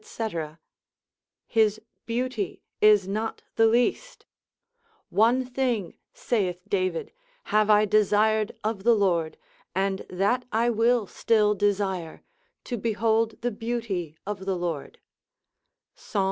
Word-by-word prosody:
his 215 -2 +2 0.3
beauty 240 -4 -3 0.2
is 210 -3 +5
not 215 +3 -3
the 225 - +5
least, 245 - 0 0.9
one 235 +6 +3
thing, 245 -7 -1 0.2
saith 185 -7 -1
David, 185 -4 -1 0.4
have 215 0 +4
I 210 0 +6
desired 215 +1 +2
of 215 -2 -2
the 235 +1 +5
Lord, 175 -6 +1 0.4
and 195 0 0
that 200 +8 +1
I 230 +2 +2
will 230 0 +2
still 210 +2 +2
desire, 195 -4 -1 0.4
to 245 - -4
behold 225 +1 0
the 245 +1 -1
beauty 215 -8 -4
of 200 -1 -5
the 190 - +1
Lord, 170 -5 -4 1.0
Psal. 210 - -4
215 Hz, 110 wpm, -26 LUFS, 195-230 Hz, 1.0 s, I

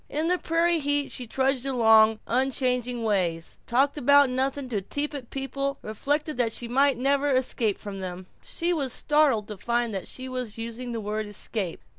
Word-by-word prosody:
In 310 +3 -1
the 360 0 +2
prairie 335 +1 +2
heat 290 -1 0
she 250 -3 -5
trudged 265 +1 0
along 225 -4 +5
unchanging 250 -1 0
ways, 175 -6 -1
talked 275 +5 +2
about 285 0 +5
nothing 265 +1 -1
to 210 -5 -1
tepid 285 +3 -4
people, 275 +1 -3
and - - -7
reflected 290 +6 -1
that 235 -2 +1
she 235 - -4
might 270 +2 +3
never 280 +3 +1
escape 250 -5 +1
from 200 -2 -7
them. 185 -1 -6 0.2
She 345 +1 -1
was 280 -6 -1
startled 280 -7 +2
to 210 - -6
find 235 +2 -1
that 190 - -4
she 260 0 -6
was 250 -4 -5
using 235 +2 -5
the 230 -1 -3
word 215 +1 -3
"escape." 205 -3 -3
255 Hz, 180 wpm, -26 LUFS, 220-280 Hz, 0.2 s, along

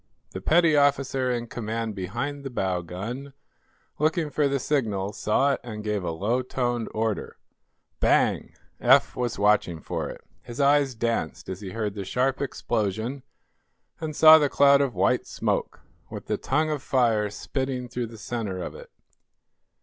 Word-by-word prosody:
The - - -6
petty 165 -1 +4
officer 140 -2 +2
in 120 -1 -1
command 115 -1 -4
behind 120 +10 -4
the 135 - -4
bow 95 -7 -1
gun, 115 - -6 0.7
looking 155 0 +1
for 150 -1 +2
the 140 0 0
signal, 105 -8 -1
saw 140 +6 +2
it - - -3
and 110 -3 -7
gave 105 -3 -1
a 85 - -2
low 105 +10 0
toned 120 -2 -2
order. 110 -1 -2 0.6
Bang! - - +2 0.2
Eph 135 +3 +4
was 120 -2 -2
watching 100 -5 +2
for - - -4
it. - - -9 0.2
His 120 +3 -9
eyes 140 -2 +3
danced 115 +1 -2
as 95 +1 -5
he 100 - -6
heard 105 0 -3
the 100 -1 -5
sharp 130 +8 0
explosion 115 -1 -2 0.8
and 155 -2 -4
saw 160 +1 +9
the 145 -2 +2
cloud 140 0 +5
of 135 -3 -1
white - - +1
smoke, - - -2 0.3
with - - -8
the - - -1
tongue 155 +3 0
of 150 -3 -2
fire 115 -6 +2
spitting 130 +3 -3
through 120 -1 -4
the 115 0 -11
center 105 -3 -4
of 90 - -5
it. - - -12
120 Hz, 165 wpm, -26 LUFS, 105-140 Hz, 0.8 s, saw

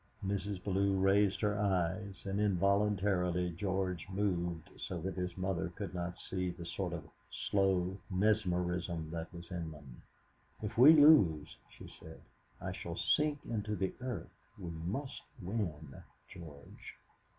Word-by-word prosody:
Mrs. 100 -1 -2
Bellew 100 0 +2
raised 95 0 +3
her 105 -1 +1
eyes, 95 0 0
and 100 +1 -1
involuntarily 100 -2 +2
George 95 0 -2
moved 90 -4 -1
so 90 - -4
that 95 +4 -3
his 90 -1 -4
mother 95 -1 -1
could 100 -3 -5
not 90 0 -4
see 90 -1 -1
the 85 -1 -7
sort 90 +1 -3
of 80 -4 -6 0.4
slow 95 -1 +2
mesmerism 90 -5 0
that 85 0 -5
was 85 0 -10
in 85 -3 -3
them. 75 -5 -12 0.6
"If 105 +2 -3
we 135 +7 +9
lose," 100 - +6
she - - -12
said, 80 0 -11 0.4
"I - - -4
shall - - -5
sink 150 -1 +2
into 105 -2 -2
the 95 -1 -1
earth. 125 -1 -5 0.2
We 90 -4 -6
must 95 - -4 0.2
win, 85 -8 -3 0.3
George." 75 -6 -11
95 Hz, 140 wpm, -34 LUFS, 85-100 Hz, 0.6 s, we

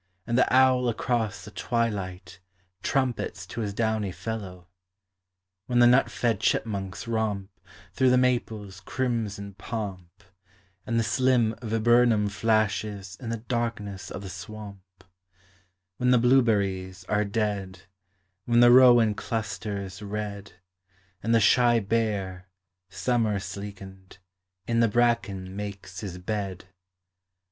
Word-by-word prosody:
And 120 - -1
the 130 - +3
owl 130 -1 +4
across 110 -4 -1
the 105 - -10
twilight 95 -7 -3 0.4
Trumpets 125 -8 -1
to 115 - -6
his 105 -2 -2
downy 110 -2 -1
fellow 95 -4 -6 1.0
When 120 - 0
the 120 - +7
nut 125 +3 +5
fed 115 -4 0
chipmunks 100 -2 -1
romp 110 -4 -2 0.4
Through 130 -1 +3
the 125 - +5
maples' 110 -6 -1
crimson 105 -3 -3
pomp, 95 -3 -6 0.6
And 115 0 +1
the - - +2
slim 120 -1 +2
viburnum 115 -1 +3
flashes 105 -2 0
In 120 -4 -6
the 115 - -2
darkness 110 -5 -4
of 100 - -7
the - - -6
Bwamp, 100 +2 -9 1.2
When 125 - +1
the 125 - +6
blueberries 100 -7 +2
are 105 +3 0
dead, 100 -3 -2 0.6
When 120 0 +3
the 120 0 +8
rowan 120 -3 +7
clusters 105 -3 -4
red, 100 -1 -5 0.7
And 115 +2 +2
the - - +6
shy 120 +2 +4
bear, 100 -4 -2 0.4
summer 105 +2 0
sleekened, 95 -1 -9 0.5
In 115 +1 0
the 115 - +5
bracken 100 -5 0
makes 100 -2 -7
his 95 -4 -6
bed. 95 -1 -4
105 Hz, 120 wpm, -26 LUFS, 100-115 Hz, 1.2 s, the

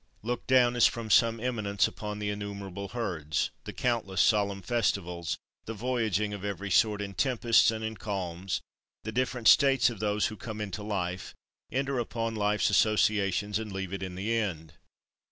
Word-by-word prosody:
30. - - -10
Look 120 - -3
down, 125 -2 +4
as 120 - +6
from 115 -2 -4
some 115 0 +4
eminence, 110 -5 0
upon 105 -1 -6
the 105 0 -2
innumerable 100 -1 -6
herds, 85 -9 -2
the - - -5
countless 115 -6 -1
solemn 100 -2 +2
festivals, 90 -6 -1 0.3
the 115 - -5
voyaging 110 -3 0
of 100 -1 -6
every 100 0 -4
sort, 105 +1 +3
in 100 -1 -6
tempests 120 -1 +3
and 110 0 -3
in 110 0 -3
calms; 95 -4 -3 0.4
the 110 - -4
different 125 -1 0
states 135 -3 +6
of 110 - -9
those 105 0 +1
who 110 - -2
come 110 0 -7
into 105 -2 -4
life, 90 -4 -3 0.4
enter 135 0 -1
upon 115 -1 -2
life's 105 -1 +1
associations, 105 0 +2
and 110 -2 -6
leave 95 -1 -4
it 100 - -4
in 95 -1 -5
the 100 +5 -2
end. 85 -9 -2
105 Hz, 170 wpm, -29 LUFS, 95-115 Hz, 0.4 s, as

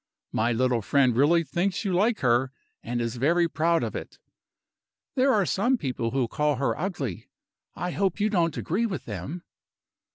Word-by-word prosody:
My 115 +2 +1
little 125 0 +1
friend 130 +2 +2
really 160 +6 +4
thinks 185 +6 -1
you 190 - 0
like 210 +5 +2
her, 125 0 +2 0.3
and 120 +1 -3
is 115 +1 -2
very 170 +7 +3
proud 165 +2 +1
of - - -4
it. - - -7 1.0
There 270 +1 +3
are 205 -6 +3
some 240 +9 +1
people 125 - -2
who 130 -1 0
call 150 +4 0
her 125 -4 0
ugly. 150 - -4 0.5
I 180 - -3
hope 195 0 0
you 210 +1 +1
don't 170 -5 +1
agree 215 +8 0
with 185 -8 -5
them?" 115 - -6
155 Hz, 170 wpm, -26 LUFS, 125-185 Hz, 1.0 s, really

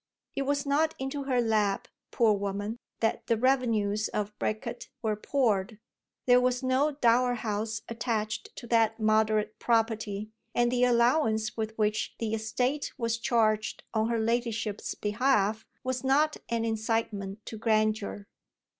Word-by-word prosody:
It 275 -1 -2
was 285 0 0
not 310 +3 +2
into 270 +1 -4
her 255 -2 +1
lap, 215 -4 +1 0.2
poor 225 -3 +3
woman, 200 +3 -3 0.2
that 225 - 0
the 230 - +2
revenues 220 -5 +1
of 210 0 -3
Bricket 225 +3 -3
were 215 -1 +1
poured. 215 -3 0 0.5
There 250 0 +6
was 250 +1 +1
no 265 +4 +2
dower 245 -2 +3
house 220 -1 -3
attached 225 -2 -3
to - - -8
that 225 -1 +2
moderate 215 0 +2
property, 220 -3 0 0.2
and 240 0 +3
the 250 0 +3
allowance 235 -2 +2
with 220 0 -4
which 215 0 0
the 225 -1 -2
estate 250 +6 -1
was 230 -2 -1
charged 215 -3 +1
on 220 0 +1
her 235 - +1
ladyship's 230 -2 -1
behalf 215 -1 +1 0.2
was 255 0 -2
not 295 +4 +3
an 230 -1 0
incitement 220 -2 -2
to 220 - -7
grandeur. 215 -2 0
225 Hz, 140 wpm, -29 LUFS, 215-245 Hz, 0.5 s, There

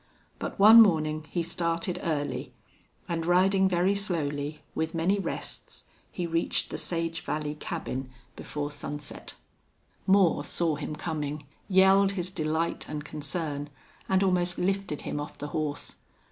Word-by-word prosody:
But - - -4
one 220 +3 +10
morning 155 -6 +3
he 175 - -1
started 170 +1 -2
early, 150 -3 -2 0.5
and, 165 -1 -1
riding 190 +3 +4
very 180 +2 +3
slowly, 150 -6 -2
with 160 +1 -2
many 180 +5 +2
rests, - - -4 0.3
he 180 - -3
reached 165 0 0
the - - -3
Sage 165 -1 -1
Valley 150 -1 -2
cabin 135 -3 -4 0.3
before 145 0 -4
sunset. 145 0 -7 0.7
Moore 190 -3 +4
saw 165 -3 0
him 150 +1 -5
coming, 150 -2 -4 0.2
yelled 195 +1 +5
his 180 -1 -2
delight 160 -1 -1
and 150 -1 -4
concern, 145 -1 -3 0.4
and 190 0 +4
almost 180 -2 +2
lifted 195 -4 -1
him - - -3
off 145 - -6
the 145 - -5
horse. 150 -2 -3
165 Hz, 135 wpm, -28 LUFS, 150-185 Hz, 0.7 s, one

